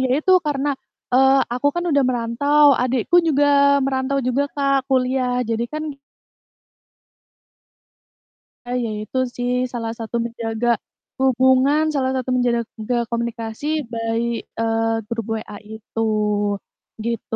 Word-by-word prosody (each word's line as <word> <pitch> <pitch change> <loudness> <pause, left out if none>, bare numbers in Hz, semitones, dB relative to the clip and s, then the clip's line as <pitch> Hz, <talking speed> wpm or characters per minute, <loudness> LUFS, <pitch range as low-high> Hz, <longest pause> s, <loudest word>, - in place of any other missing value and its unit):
Iya, 260 -1 0
itu, 375 - +4
karena, 285 0 0 0.4
eee, 265 +1 +5
aku 250 +4 +1
kan 345 0 -2
udah 285 - +3
merantau, 255 +5 +2 0.2
adikku 255 +6 +1
juga 280 -1 +4
merantau 270 +1 0
juga 255 +3 +1
Kak, 275 -1 +1
kuliah, 255 -1 +1
jadi 225 0 -2
kan 310 0 -3 2.8
Ah, 245 +1 -2
ya 230 - -2
itu 260 - -6 0.2
sih, 245 0 -2 0.2
salah 230 -2 -3
satu 225 +1 -5
menjaga 230 0 -3 0.5
hubungan, 260 +3 +3
salah 260 -2 +1
satu 255 0 -3
menjaga 235 -1 -1
komunikasi 235 +1 -4 0.3
by, 230 0 -1 0.4
eee, 225 0 +1
grup 230 -2 -3
WA 210 -1 -7 0.2
itu, 220 +1 -6 1.0
gitu. 230 -1 -3
250 Hz, 120 wpm, -21 LUFS, 230-275 Hz, 2.8 s, eee